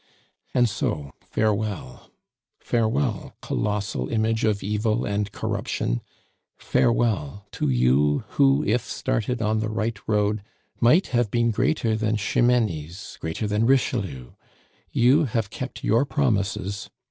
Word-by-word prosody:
"And 125 Hz, -1 st, +5 dB
so, 75 Hz, -9 st, -2 dB
farewell. 105 Hz, -2 st, -2 dB, 0.5 s
Farewell, 115 Hz, -1 st, -1 dB
colossal 100 Hz, -11 st, -2 dB
image 110 Hz, 0 st, 0 dB
of 105 Hz, -2 st, +1 dB
Evil 105 Hz, +2 st, 0 dB
and 105 Hz, 0 st, -1 dB
Corruption; -, -, -2 dB, 0.6 s
farewell 100 Hz, -7 st, +1 dB
to -, -, -1 dB
you 65 Hz, -, +3 dB
who, 140 Hz, +1 st, +3 dB
if 120 Hz, +3 st, +2 dB
started 120 Hz, +2 st, -2 dB
on 110 Hz, 0 st, +1 dB
the 110 Hz, 0 st, -1 dB
right 110 Hz, 0 st, -2 dB
road, 105 Hz, -1 st, +1 dB, 0.4 s
might 155 Hz, +11 st, +4 dB
have 120 Hz, -3 st, +2 dB
been 120 Hz, +1 st, +2 dB
greater 125 Hz, -1 st, +1 dB
than 110 Hz, 0 st, 0 dB
Ximenes, 105 Hz, -6 st, 0 dB
greater 80 Hz, +7 st, -3 dB
than 105 Hz, +2 st, +1 dB
Richelieu! 100 Hz, -, 0 dB, 0.6 s
You 135 Hz, +7 st, +4 dB
have 110 Hz, -4 st, -2 dB
kept 130 Hz, -, -6 dB
your 115 Hz, +4 st, +3 dB
promises. 100 Hz, -8 st, -1 dB
110 Hz, 120 wpm, -24 LUFS, 100-120 Hz, 0.6 s, And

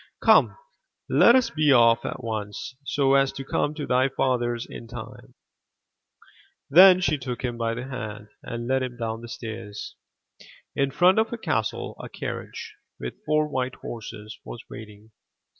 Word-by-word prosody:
Come, -, -, +5 dB, 0.5 s
let 235 Hz, -, +7 dB
us 260 Hz, -2 st, +3 dB
be 155 Hz, -2 st, +3 dB
off 115 Hz, -3 st, +5 dB
at -, -, -5 dB
once, 110 Hz, +3 st, -5 dB
so 135 Hz, -1 st, +1 dB
as 135 Hz, 0 st, +4 dB
to 135 Hz, 0 st, -7 dB
come 145 Hz, +2 st, -1 dB
to 150 Hz, -2 st, -4 dB
thy 130 Hz, +2 st, +2 dB
father*s 120 Hz, -3 st, 0 dB
in 115 Hz, -, -9 dB
time/' 120 Hz, +2 st, -10 dB, 1.4 s
Then 185 Hz, +3 st, +8 dB
she 150 Hz, -3 st, +1 dB
took 125 Hz, -1 st, -5 dB
him 120 Hz, -2 st, -2 dB
by 115 Hz, -1 st, -1 dB
the 125 Hz, -, -5 dB
hand, 110 Hz, -5 st, -7 dB
and 120 Hz, 0 st, -6 dB
led 130 Hz, +1 st, +1 dB
him 125 Hz, -1 st, -4 dB
down 115 Hz, -1 st, -3 dB
the 120 Hz, -, -9 dB
stairs. 110 Hz, -4 st, -7 dB, 0.8 s
In 140 Hz, 0 st, +1 dB
front 180 Hz, +9 st, +4 dB
of 225 Hz, -, +1 dB
the 235 Hz, -, -4 dB
castle 110 Hz, -, -2 dB
a -, -, -8 dB
carriage, -, -, -6 dB, 0.3 s
with 60 Hz, -, -7 dB
four 155 Hz, 0 st, +2 dB
white 130 Hz, -3 st, -2 dB
horses, 110 Hz, -1 st, -8 dB
was 120 Hz, -, -9 dB
waiting. 105 Hz, 0 st, -11 dB
125 Hz, 160 wpm, -25 LUFS, 115-140 Hz, 1.4 s, Then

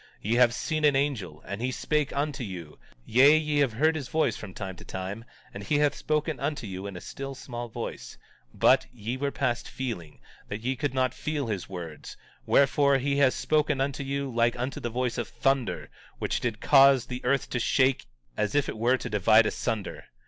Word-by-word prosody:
Ye 110 Hz, -, -1 dB
have 125 Hz, -1 st, +6 dB
seen 155 Hz, +5 st, -2 dB
an 145 Hz, -2 st, +5 dB
angel, 115 Hz, -, -2 dB
and 100 Hz, +2 st, -5 dB
he 125 Hz, -, 0 dB
spake 150 Hz, +2 st, -1 dB
unto 140 Hz, -2 st, -2 dB
you; 90 Hz, -7 st, -8 dB, 0.3 s
yea, 140 Hz, +6 st, +6 dB
ye 150 Hz, -1 st, 0 dB
have 135 Hz, -5 st, +2 dB
heard 155 Hz, +8 st, +2 dB
his 145 Hz, -5 st, -4 dB
voice 160 Hz, +3 st, +1 dB
from 110 Hz, -, -8 dB
time 95 Hz, 0 st, -6 dB
to -, -, -12 dB
time; 95 Hz, +5 st, -6 dB, 0.3 s
and 100 Hz, -, -7 dB
he 145 Hz, +8 st, +1 dB
hath 145 Hz, -1 st, +3 dB
spoken 155 Hz, -1 st, -1 dB
unto 145 Hz, -3 st, -2 dB
you 95 Hz, 0 st, -6 dB
in 95 Hz, -2 st, -7 dB
a -, -, -6 dB
still 135 Hz, 0 st, -7 dB
small 120 Hz, -2 st, -7 dB
voice, -, -, -6 dB, 0.3 s
but -, -, +4 dB
ye 120 Hz, 0 st, -4 dB
were 140 Hz, +2 st, -1 dB
past 120 Hz, -3 st, -1 dB
feeling, 100 Hz, -, -5 dB, 0.3 s
that 105 Hz, +1 st, -5 dB
ye 130 Hz, +3 st, -1 dB
could 140 Hz, 0 st, -2 dB
not 130 Hz, -1 st, +1 dB
feel 150 Hz, -2 st, -3 dB
his 105 Hz, -5 st, -4 dB
words; 85 Hz, -5 st, -8 dB, 0.3 s
wherefore, 140 Hz, 0 st, +4 dB
he 140 Hz, +1 st, 0 dB
has 140 Hz, -2 st, +4 dB
spoken 150 Hz, -2 st, +1 dB
unto 135 Hz, 0 st, -1 dB
you 140 Hz, +1 st, -2 dB
like 115 Hz, +1 st, +2 dB
unto 125 Hz, +2 st, -3 dB
the 120 Hz, -, -3 dB
voice 125 Hz, +1 st, -2 dB
of 120 Hz, -, -2 dB
thunder, 135 Hz, -4 st, -1 dB, 0.3 s
which -, -, -1 dB
did 115 Hz, -3 st, -2 dB
cause 135 Hz, -3 st, +6 dB
the 125 Hz, 0 st, -6 dB
earth 140 Hz, +2 st, +1 dB
to 120 Hz, -, 0 dB
shake 130 Hz, -, +2 dB, 0.3 s
as 105 Hz, -, -1 dB
if 145 Hz, -, +2 dB
it -, -, -5 dB
were 125 Hz, +3 st, +3 dB
to 125 Hz, -, -6 dB
divide 110 Hz, +1 st, +5 dB
asunder. 105 Hz, -1 st, -3 dB
130 Hz, 205 wpm, -27 LUFS, 110-140 Hz, 0.3 s, have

